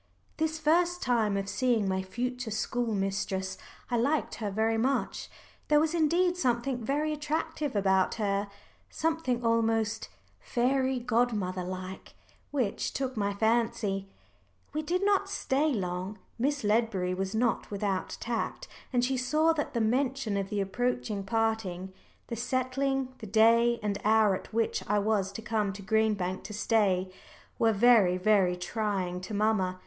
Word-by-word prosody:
This 315 0 0
first 345 +3 +2
time 225 -5 +2
of 195 0 -3
seeing 235 -2 +1
my 190 0 0
future 245 +5 -4
school 225 +1 -1
mistress 195 -1 -2 0.4
I 240 - +2
liked 285 +6 +1
her 210 - -1
very 220 +2 +1
much. 265 +4 -1 0.4
There 300 0 +5
was 315 +1 +1
indeed 345 +2 +2
something 250 -5 0
very 295 +6 0
attractive 300 -2 -2
about 190 -2 +2
her 200 -1 0 0.4
something 315 -7 -1
almost 225 -1 +1 0.3
"fairy 260 +1 +1
godmother 220 -6 0
like" 185 +1 -7 0.3
which 255 -8 -1
took 265 -1 -2
my 200 -2 -1
fancy. 220 -3 0 0.6
We 305 - -1
did 360 +5 -1
not 400 -1 +2
stay 305 -6 +1
long. 185 -2 -3 0.2
Miss 280 +3 0
Ledbury 210 -4 +1
was 190 +2 -3
not 235 +1 0
without 200 -2 -2
tact, 240 - -3 0.2
and 245 -2 +2
she 265 +1 0
saw 305 +6 +2
that 295 -4 -3
the 235 - +2
mention 250 -1 0
of 195 -1 -2
the 205 -1 -1
approaching 215 0 -1
parting, 200 -4 -1 0.3
the 235 - -5
settling 255 +2 -1
the 220 - -7
day 230 +3 +4
and 205 -1 -1
hour 215 -1 +4
at 185 - -6
which 225 0 0
I 210 - +3
was 205 -2 +1
to 225 - -7
come 215 -2 0
to 200 +1 -9
Green 220 +1 +2
Bank 185 -1 -3
to 210 - -7
stay, 195 -4 +1 0.5
were 225 -1 +4
very, 210 -4 +5
very 190 -2 +3
trying 185 -2 -2
to 205 +3 -5
mamma. 200 -3 +1
225 Hz, 150 wpm, -29 LUFS, 200-255 Hz, 0.6 s, There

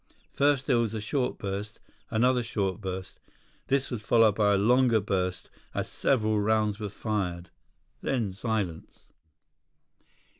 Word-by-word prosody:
First 140 -1 +2
there 125 -5 +3
was 115 -2 -1
a - - -2
short 125 +5 -1
burst. 100 +1 -5 0.3
Another 125 +3 +3
short 100 -4 -2
burst. 95 -1 -6 0.5
This 135 0 0
was 120 -4 -3
followed 115 -1 +4
by 105 -1 +3
a - - +3
longer 120 +2 +4
burst 95 -3 -2 0.2
as - - -1
several 110 -5 +1
rounds 105 0 +1
were 105 -2 -3
fired. 90 -5 -3 0.5
Then, 115 -8 -1
silence. 100 -5 -3
110 Hz, 135 wpm, -28 LUFS, 100-120 Hz, 0.5 s, followed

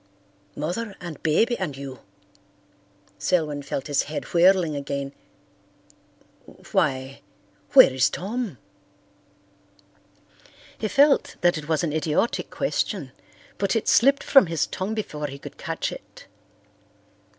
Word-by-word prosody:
"Mother 190 +8 -4
and 170 -4 -8
Baby 225 +10 +2
and 155 -8 -3
you!" 135 -2 -8 1.2
Selwyn 150 - 0
felt 140 -1 -4
his 145 -1 +1
head 155 - -4
whirling 175 -2 +4
again. 140 0 -4 1.6
"Why, 135 -8 0 0.5
where - - +8
is 130 -2 +3
Tom?" 210 - -4 2.2
He 215 - -3
felt 280 +5 +3
that 175 0 +4
it 155 0 -7
was 160 +2 +1
an 155 -3 -1
idiotic 160 +8 0
question, - - -2 0.5
but 195 +3 0
it 225 - -1
slipped 275 +3 +4
from 270 -9 +6
his 165 -2 0
tongue 200 +4 -4
before 150 -9 -4
he 140 0 -8
could - - -11
catch - - -3
it. - - -12
160 Hz, 115 wpm, -24 LUFS, 145-200 Hz, 2.2 s, where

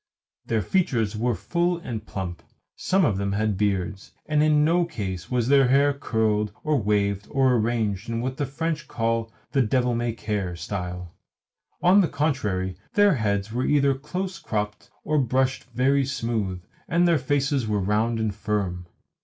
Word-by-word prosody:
Their 110 -2 +1
features 120 - +1
were 120 +2 0
full 175 +5 0
and 115 -11 -5
plump, 90 -5 -5 0.3
some 190 -1 +2
of 100 -8 +1
them 100 0 -1
had 105 0 0
beards, 100 -1 -2
and 150 -1 +2
in 150 -1 +4
no 170 +2 +3
case 95 - -5
was 120 -2 0
their 135 -1 +5
hair 140 +2 +4
curled 110 -6 0
or 150 -4 +1
waved 100 -1 0
or 135 -2 +3
arranged 110 -3 0
in 115 0 -1
what 130 +2 -3
the 145 - -1
French 155 +2 -3
call 115 0 -1 0.2
"the 135 - +3
devil 125 +1 +1
may 120 0 -1
care" 105 -5 -3
style. 90 0 -5 0.7
On 185 +3 +6
the 180 - +2
contrary, 105 - -1 0.2
their 205 -2 +5
heads 105 -5 -1
were 125 +2 0
either 140 -2 +3
close 180 +8 -5
cropped 105 -1 -3
or 155 -1 +1
brushed 130 +1 +1
very 130 +3 +2
smooth, 110 -9 -2 0.2
and 175 +2 +3
their 165 -3 +3
faces 135 -1 0
were 105 -1 0
round 110 +4 +1
and 110 -2 -1
firm. 100 -4 -2
115 Hz, 165 wpm, -25 LUFS, 105-140 Hz, 0.7 s, On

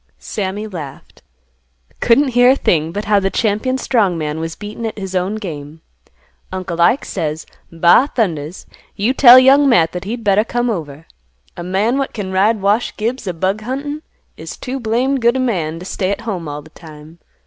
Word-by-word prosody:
Sammy 205 +1 -4
laughed, 160 -10 -9 0.8
"Couldn't 265 +4 +3
hear 245 0 +4
a 265 - +5
thing 160 - 0
but 205 +4 -4
how 205 -1 +3
the 195 0 0
champion 225 +5 0
strong 210 -10 +1
man 155 0 -3
was 165 0 -5
beaten 210 +2 -8
at 220 - -7
his 190 -2 -6
own 185 +3 -1
game. 160 -6 -7 0.7
Uncle 185 -2 -4
Ike 240 +11 +3
says, 155 0 -4 0.3
'Ba 170 - +4
thundas! 170 - -2 0.3
You 220 +6 0
tell 255 -2 +9
Young 270 +2 +6
Matt 170 -9 +3
that 180 +1 -6
he'd 230 +3 -5
better 205 0 +3
come 240 +1 -1
over. 155 -5 -6 0.5
A - - -7
man 200 +9 0
what 275 - -3
can 200 -4 -5
ride 205 +3 +2
Wash 210 +4 +1
Gibbs 230 +1 -3
a 180 - -1
bug 190 +5 -1
huntin' 280 +6 -4 0.4
is - - -8
too 265 +1 -5
blamed 250 +4 0
good 235 +2 +3
a - - -1
man 175 -11 -1
t' 175 - -9
stay 185 0 -2
at 200 - -2
home 190 -8 -4
all 145 0 -6
th' 155 - -18
time. 155 0 -14
200 Hz, 190 wpm, -17 LUFS, 170-240 Hz, 0.8 s, tell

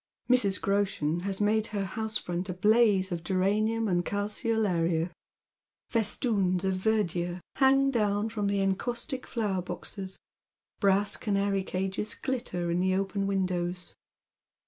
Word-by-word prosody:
Mm. 205 -6 +4
Groshen 195 -5 0
bus 195 +2 -3
made 215 +1 +2
her 200 -2 -2
house 220 +3 -2
front 180 +2 -4
a 180 - -3
blaze 205 -1 +4
of 170 -1 -3
geranium 210 +5 +1
and 175 -2 +1
calceoluria, 200 -5 0 0.8
festoons 200 -5 +1
of 190 - +1
verdure 185 -3 0 0.2
hang 275 0 +4
down 210 -3 +1
from 215 -2 -2
the 200 0 +1
encaustic 240 +7 -2
flowcr 205 -6 -1
boses, 190 +2 -6 0.6
brass 200 0 +3
canary 200 -2 0
cages 190 +3 -3
glitter 230 -10 -3
in 175 - +1
the 185 +1 +2
open 195 +1 -1
windows. 180 -2 -2
195 Hz, 125 wpm, -29 LUFS, 185-215 Hz, 0.8 s, Mm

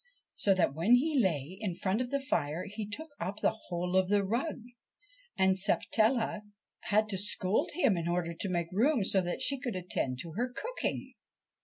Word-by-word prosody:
so 195 -2 +2
that 175 -7 +2
when 175 +11 +4
he 290 +3 +2
lay 180 - 0
in 190 -5 -2
front 195 +6 0
of 250 - -3
the 280 +1 0
fire 165 - -1
he 210 +1 -5
took 315 +10 -7
up 190 +4 -3
the - - +1
whole 180 +1 -2
of 190 -1 +3
the 205 0 +3
rug, 235 +11 -2 0.8
and 190 0 +4
Sapatella 220 +3 +2 0.4
had 215 +1 +2
to 190 -2 -1
scold 205 - +1
him 270 - +3
in 170 -1 -2
order 170 -1 -1
to 180 +4 -3
make 170 -2 -2
room 235 +5 +2
so 190 0 +3
that 175 -1 -3
she 275 -1 +1
could 250 -6 -4
attend 175 -8 -2
to 165 +6 -7
her 240 +9 -2
cooking. 470 - -3
195 Hz, 190 wpm, -31 LUFS, 175-240 Hz, 0.8 s, when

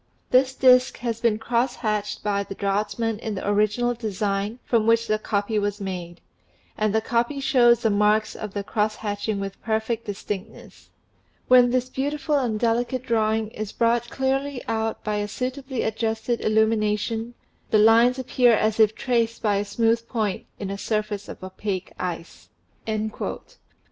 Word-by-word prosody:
This 260 +1 +4
disk 255 -1 +5
has 230 -2 -3
been 230 -3 +2
cross 240 +3 0
hatched 210 -3 -2
by 205 -1 0
the 195 0 -7
draughtsman 210 +3 -1
in 220 -2 -4
the 190 - -5
original 215 +4 +2
design 210 -1 -2
from 225 -2 +2
which 230 0 +4
the 215 -1 0
copy 210 0 -1
was 205 0 -2
made; 180 -3 -6 0.5
and 215 -1 +1
the 220 +1 +2
copy 235 +5 0
shows 245 -3 +4
the 220 - +3
marks 210 +1 +2
of 210 -2 -7
the 200 - -2
cross 210 +1 0
hatching 205 0 -3
with 195 0 -6
perfect 220 +1 -1
distinctness. 205 +1 -7 0.6
When 250 -1 +7
this 255 0 0
beautiful 290 +3 -1
and 230 -5 -1
delicate 240 +2 0
drawing 220 -2 +1
is 215 -2 -6
brought 235 0 +1
clearly 270 0 -1
out 225 0 -2
by 210 -1 -1
a 205 0 -1
suitably 260 +4 -4
adjusted 220 +1 -1
illumination, 220 +1 +1 0.3
the 215 - +4
lines 230 +4 +5
appear 250 -2 +3
as 215 +1 0
if 220 -1 +5
traced 230 -2 0
by 205 -2 +2
a 200 - 0
smooth 230 +2 +1
point 215 -6 -2
in 195 -1 -5
a 200 - -5
surface 210 -2 -2
of - - -9
opaque 190 0 -4
ice." 175 -2 -6
220 Hz, 160 wpm, -24 LUFS, 210-240 Hz, 0.6 s, When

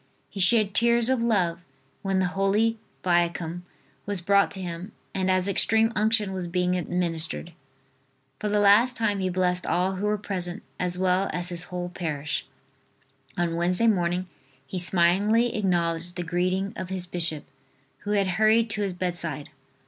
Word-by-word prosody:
He 200 - -7
shed 200 +2 +3
tears 235 +1 +3
of 260 -2 +1
love 185 -8 +1 0.4
when 195 -1 0
the 190 - +2
Holy 210 +4 +1 0.2
Viaticum 175 -1 0 0.5
was 205 -2 -2
brought 200 +3 +3
to 190 - -7
him 180 +2 -6 0.2
and 190 0 0
as 185 0 +2
Extreme 220 +3 +2
Unction 215 -2 +1
was 185 -2 -4
being 180 +1 0
administered. 165 - -2 0.9
For 210 - -2
the 210 - +1
last 210 +5 +5
time 210 -4 0
he 185 -1 0
blessed 180 0 0
all 185 +2 0
who 205 +2 -1
were 210 0 +1
present 180 -3 -3 0.2
as 180 0 +1
well 185 +1 +1
as 175 0 0
his 175 -1 -2
whole 180 0 -5
parish. 150 -4 -4 0.9
On 170 -1 0
Wednesday 180 +5 +2
morning 180 -4 +1 0.4
he 185 +6 -4
smilingly 195 +7 +3
acknowledged 175 -4 0
the 175 - -3
greeting 185 +4 -1
of 185 -3 -6
his 190 -1 -3
bishop, 165 -4 -2 0.6
who 205 - -3
had 200 -1 +2
hurried 220 +4 +3
to 210 -1 0
his 195 -2 -1
bedside. 170 -4 -4
185 Hz, 160 wpm, -26 LUFS, 175-205 Hz, 0.9 s, last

